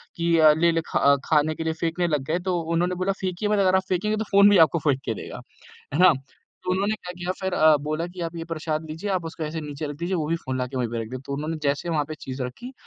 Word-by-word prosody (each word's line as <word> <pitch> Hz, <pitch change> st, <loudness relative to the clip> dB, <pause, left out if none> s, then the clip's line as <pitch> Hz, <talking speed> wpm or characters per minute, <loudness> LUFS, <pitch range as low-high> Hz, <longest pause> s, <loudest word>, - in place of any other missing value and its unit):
कि 170 Hz, 0 st, +2 dB
अ, 155 Hz, -1 st, +8 dB
लेले 165 Hz, +1 st, +2 dB
ख -, -, -1 dB, 0.3 s
खाने 155 Hz, 0 st, +2 dB
के 160 Hz, -, -4 dB
लिए 160 Hz, 0 st, -1 dB
फेकने 170 Hz, +2 st, -1 dB
लग 150 Hz, -4 st, 0 dB
गए। 165 Hz, +3 st, 0 dB
तो 180 Hz, -1 st, -1 dB
उन्होंने 170 Hz, +2 st, 0 dB
बोला 185 Hz, +2 st, 0 dB
फेंकिये 185 Hz, +2 st, -2 dB
मत, 210 Hz, -, +2 dB
अगर 190 Hz, -1 st, +4 dB
आप 190 Hz, -, +2 dB
फेकेंगे 210 Hz, +4 st, 0 dB
तो 220 Hz, -, -1 dB
फ़ोन 200 Hz, +1 st, +7 dB
भी 205 Hz, -, +5 dB
आपको 160 Hz, +2 st, -2 dB
फेंक 140 Hz, -3 st, +1 dB
के 115 Hz, -, -1 dB
देगा। -, -, -8 dB, 0.6 s
है -, -, 0 dB
ना? 185 Hz, -1 st, +8 dB, 0.5 s
तो 180 Hz, -, -1 dB
उन्होंने 200 Hz, +3 st, +1 dB
क्या 180 Hz, -4 st, -8 dB
किया 180 Hz, +1 st, -2 dB
फिर 190 Hz, -1 st, -1 dB
अ, 155 Hz, -1 st, +6 dB
बोला 155 Hz, +3 st, -3 dB
कि 175 Hz, 0 st, -10 dB
आप 165 Hz, 0 st, -4 dB
ये 165 Hz, -, -4 dB
प्रसाद 155 Hz, 0 st, -3 dB
लीजिए, 165 Hz, +7 st, -4 dB
आप 185 Hz, -3 st, -1 dB
उसको 160 Hz, 0 st, -5 dB
ऐसे 155 Hz, +1 st, -4 dB
नीचे 150 Hz, 0 st, -5 dB
रख 145 Hz, -1 st, -6 dB
दीजिए, 170 Hz, +4 st, -2 dB
वो 155 Hz, -3 st, -1 dB
भी 165 Hz, -, +1 dB
फ़ोन 130 Hz, -5 st, -4 dB
ला 125 Hz, -, -1 dB
के 130 Hz, +1 st, -8 dB
वहीं 125 Hz, -2 st, 0 dB
पे 115 Hz, 0 st, -3 dB
रख 110 Hz, -, -8 dB
देगा। 130 Hz, 0 st, -6 dB
तो 140 Hz, -, -4 dB
उन्होंने 155 Hz, +3 st, -3 dB
जैसे 145 Hz, +3 st, 0 dB
वहाँ 155 Hz, -3 st, +1 dB
पे 155 Hz, -, -4 dB
चीज़ 130 Hz, 0 st, -5 dB
रखी, 125 Hz, -, -7 dB
165 Hz, 285 wpm, -24 LUFS, 150-180 Hz, 0.6 s, अ